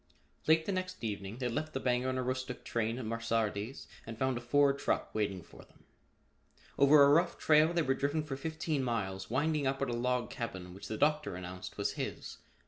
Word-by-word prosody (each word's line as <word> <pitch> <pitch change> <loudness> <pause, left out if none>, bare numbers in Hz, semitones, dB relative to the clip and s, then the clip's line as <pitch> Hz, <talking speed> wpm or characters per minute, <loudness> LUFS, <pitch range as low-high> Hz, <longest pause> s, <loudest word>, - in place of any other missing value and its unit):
Late 160 0 +5
the - - -1
next 185 -4 -4
evening 100 -1 -4
they 125 -1 -1
left 155 +6 -3
the 135 - -1
Bangor 125 0 +1
and 130 - -1
Aroostook 130 0 -3
train 115 0 -1
at 130 - -5
Mesardis 115 0 -2 0.2
and 115 0 -8
found 130 0 +1
a 120 - -4
Ford 140 +3 +3
truck - - -1
waiting 100 -4 -1
for - - -15
them. - - -24 0.9
Over 140 +1 +7
a 140 - +7
rough 170 +4 +3
trail 155 +1 +5
they 170 -1 +1
were 135 - +2
driven 145 +3 -1
for 145 -3 -4
fifteen 155 0 -2
miles, 95 -6 -2
winding 145 +3 +1
up 135 0 0
at 140 -3 -1
a - - -1
log 125 0 0
cabin 95 -7 -5
which 95 - -9
the 110 - -4
Doctor 150 -5 +1
announced 90 0 -7
was - - 0
his. - - -5
130 Hz, 205 wpm, -32 LUFS, 115-145 Hz, 0.9 s, Over